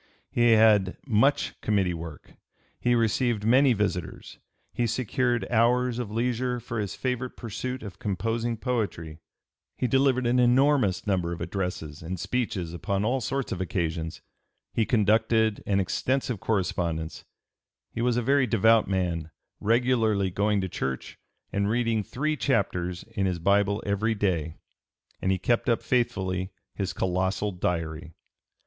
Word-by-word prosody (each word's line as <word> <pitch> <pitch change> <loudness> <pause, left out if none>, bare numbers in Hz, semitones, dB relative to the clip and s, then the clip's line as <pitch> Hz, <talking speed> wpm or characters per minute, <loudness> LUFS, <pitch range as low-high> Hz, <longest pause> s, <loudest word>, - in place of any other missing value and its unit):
He 120 -1 +4
had 105 -4 +4
much 135 +3 +2
committee 100 -4 +1
work; 80 -2 -8 0.5
he 120 0 +2
received 115 -1 +1
many 130 +3 +5
visitors; 100 -5 -3 0.3
he 120 - 0
secured 120 +1 0
hours 120 +1 +2
of 120 -4 -3
leisure 125 +2 -1
for 115 0 -5
his 100 -3 -3
favorite 125 -1 -3
pursuit 125 +3 -5
of 100 -3 -9
composing 115 +3 -1
poetry; 105 -10 -3 0.6
he - - 0
delivered 130 0 +2
an 120 +1 +3
enormous 125 -4 +3
number 90 -4 0
of 85 - -7
addresses 85 -5 -4
and 85 +3 -5
speeches 95 -6 -2
upon 95 +4 -1
all 130 +3 +1
sorts 135 +1 -2
of 95 - -3
occasions; 80 -3 -2 0.5
he 110 - +1
conducted 110 0 +2
an 100 -1 +2
extensive 125 +4 -1
correspondence; 85 -6 -2 0.7
he 115 - -3
was 120 0 +2
a 120 - +1
very 135 +1 +3
devout 115 +1 +4
man, 85 -4 -1 0.3
regularly 110 -4 +2
going 105 +2 +1
to 95 - -2
church 65 -7 -4 0.3
and 100 0 +1
reading 115 -1 +1
three 155 +9 -2
chapters 90 -10 -1
in 95 -1 -1
his 90 -2 -1
Bible 100 +3 +2
every 110 +3 0
day; 85 -6 -1 0.7
and 95 - +1
he 95 - +2
kept 120 +6 +1
up 115 - +1
faithfully 95 -6 0 0.2
his 95 -2 -2
colossal 95 +3 -1
Diary. 85 -2 -3
105 Hz, 140 wpm, -27 LUFS, 95-120 Hz, 0.7 s, many